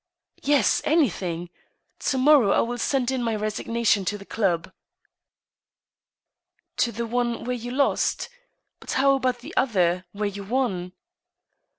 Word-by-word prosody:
" - - -34
Yes, 285 - +3
anything. 180 - 0 0.6
To 265 - 0
morrow 260 -6 +5
I - - +3
will 240 +1 -3
send 260 0 0
in 260 -1 -1
my 230 -2 0
resignation 215 0 0
to 205 +2 -1
the 195 - -12
club." 185 -6 -1 1.4
" - - -52
To 235 - +2
the 235 +2 -4
one 240 0 -1
where 250 +1 -2
you 240 0 -6
lost; 275 +3 +1 0.5
but - - -6
how 275 +1 +4
about 255 -2 0
the - - -10
other, 180 -7 +1
where 205 +1 -2
you 200 0 -6
won 195 -6 -1
235 Hz, 150 wpm, -25 LUFS, 200-255 Hz, 1.4 s, morrow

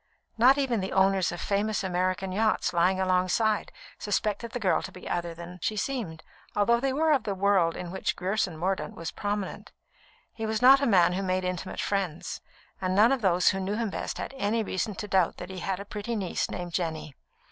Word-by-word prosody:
Not 255 +4 +6
even 260 -5 +1
the 190 0 -3
owners 190 -1 +3
of 175 - -6
famous 205 +2 0
American 185 +1 -1
yachts 210 -2 +1
lying 180 +2 +3
alongside 185 +4 +1 0.3
suspected 210 +2 -1
the 245 - -4
girl 195 -5 +2
to - - -7
be 180 - -11
other 170 -1 -2
than 175 +2 -9
she 215 - -1
seemed, 205 -10 -3 0.3
though 235 +3 +3
they 270 +2 0
were 310 +4 +2
of 280 -4 +4
the 200 - -3
world 190 -3 +2
in 175 -1 -6
which 190 - -2
Grierson 190 -3 -1
Mordaunt 180 -2 -2
was 165 0 -5
prominent. 205 -1 -4 0.6
He 225 -1 -4
was 220 0 0
not 270 +2 +7
a 280 - +2
man 180 -5 +5
who 190 - -1
made 185 -1 0
intimate 180 0 -4
friends, 190 -5 -2 0.4
and 185 0 0
none 215 +5 +6
of 270 -2 +1
those 180 -3 +4
who 195 - -1
knew 195 +2 -2
him 225 -2 -2
best - - -4
had - - -5
any 220 0 0
reason 200 +1 -2
to 210 - -5
doubt 190 -3 +2
that 180 +1 -7
he 185 - -6
had 190 0 -2
a 200 - -7
pretty 210 +3 -4
niece 190 -5 -2
named 175 -1 -5
Jenny. 160 -4 -3
195 Hz, 210 wpm, -28 LUFS, 180-215 Hz, 0.6 s, not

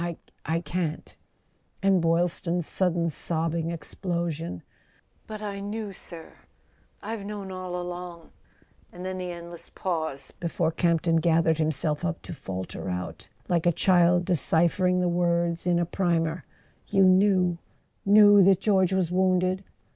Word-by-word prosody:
I 165 +1 0
can't 175 -3 -4 0.4
" - - -34
and 195 -2 +4
Boylston's 170 +1 0
sudden 170 -2 +1
sobbing 165 +1 -1
explosion: 170 - -4 0.3
" - - -38
But 215 -1 -7
I 200 -1 -4
knew, 205 0 -5
sir—I've 195 +5 -10
known 200 -1 -6
all 185 -1 -5
along.. 175 -1 -7 0.3
." - - -34
and 180 +1 -9
then 185 0 -4
the 180 -1 -4
endless 170 -1 -9
pause 160 -7 -4
before 170 -1 -2
Camp¬ 170 -1 +1
ton 165 -1 +2
gathered 160 -1 +2
himself 155 0 0
up 175 -1 -3
to - - -7
falter 95 - -6
out 90 +1 -5 0.2
(like 175 -1 +1
a - - +6
child 175 0 +3
de¬ 180 - +2
ciphering 180 +4 +3
the 180 - +1
words 170 0 0
in 175 -1 +3
a 170 - +1
primer): 170 -2 -1 0.4
"You 195 - +3
knew 185 -2 +4 0.4
—knew 205 0 +7
that 190 -1 +5
George 190 -2 +2
was 185 -3 0
wounded?" 185 0 +1
175 Hz, 145 wpm, -26 LUFS, 165-185 Hz, 0.4 s, knew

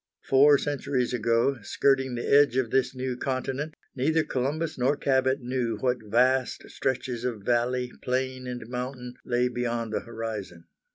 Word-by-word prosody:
Four 140 +2 +6
centuries 140 -3 -1
ago, 115 +3 +2
skirting 135 +3 +1
the 120 - -4
edge 140 -3 +5
of 125 -3 0
this 130 -1 +1
new 130 0 -3
continent, 135 +4 -3 0.2
neither 155 +5 +2
Columbus 145 +6 -2
nor 130 +3 +1
Cabot 130 0 +1
knew 120 -3 -2
what 125 +1 0
vast 125 +4 +1
stretches 130 -2 -2
of 115 -5 -3
valley, 125 +2 0
plain, 130 0 -2
and 125 -2 -6
mountain 125 0 -5
lay 125 0 +1
beyond 120 -2 -2
the - - +1
horizon. 110 -7 -6
125 Hz, 150 wpm, -27 LUFS, 120-135 Hz, 0.2 s, Four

